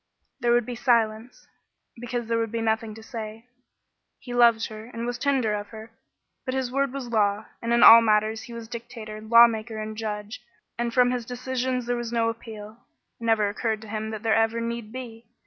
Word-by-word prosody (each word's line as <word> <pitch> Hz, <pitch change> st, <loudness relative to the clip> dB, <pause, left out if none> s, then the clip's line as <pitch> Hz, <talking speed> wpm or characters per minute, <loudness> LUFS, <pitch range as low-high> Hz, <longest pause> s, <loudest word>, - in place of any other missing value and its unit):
There 240 Hz, -, +1 dB
would 240 Hz, -1 st, +3 dB
be 245 Hz, -, -5 dB
silence, 230 Hz, -1 st, 0 dB, 0.5 s
because 240 Hz, 0 st, -4 dB
there 230 Hz, 0 st, 0 dB
would 225 Hz, -1 st, -2 dB
be 230 Hz, -, -2 dB
nothing 220 Hz, -1 st, -1 dB
to 220 Hz, -, -12 dB
say. 220 Hz, 0 st, -7 dB, 0.7 s
He 245 Hz, -, -9 dB
loved 235 Hz, -2 st, +5 dB
her 215 Hz, 0 st, -9 dB
and 230 Hz, -1 st, -6 dB
was 245 Hz, 0 st, -3 dB
tender 260 Hz, -6 st, +1 dB
of 205 Hz, 0 st, -4 dB
her, 220 Hz, 0 st, -11 dB, 0.5 s
but 260 Hz, -1 st, -3 dB
his 260 Hz, -2 st, -2 dB
word 275 Hz, 0 st, 0 dB
was 265 Hz, -3 st, -6 dB
law, 210 Hz, -2 st, +1 dB, 0.2 s
and 230 Hz, -, -2 dB
in 235 Hz, -, +4 dB
all 230 Hz, +1 st, +11 dB
matters 215 Hz, 0 st, +2 dB
he 240 Hz, -, -10 dB
was 230 Hz, -1 st, -8 dB
dictator, 230 Hz, -2 st, -8 dB
lawmaker, 225 Hz, 0 st, +4 dB
and 215 Hz, 0 st, -5 dB
judge, 210 Hz, 0 st, -5 dB, 0.3 s
and 240 Hz, 0 st, -2 dB
from 245 Hz, 0 st, +4 dB
his 250 Hz, -1 st, -2 dB
decisions 255 Hz, +1 st, -3 dB
there 245 Hz, 0 st, -1 dB
was 240 Hz, -1 st, -4 dB
no 230 Hz, -1 st, +1 dB
appeal. 220 Hz, 0 st, -9 dB, 0.4 s
It 230 Hz, -, -7 dB
never 220 Hz, -2 st, +3 dB
occurred 215 Hz, +1 st, -2 dB
to 220 Hz, -, -11 dB
him 220 Hz, 0 st, -3 dB
that 220 Hz, 0 st, -6 dB
there 225 Hz, -1 st, +2 dB
ever 225 Hz, +1 st, +2 dB
need 230 Hz, -1 st, -4 dB
be. 235 Hz, -2 st, -9 dB
230 Hz, 200 wpm, -25 LUFS, 220-240 Hz, 0.7 s, all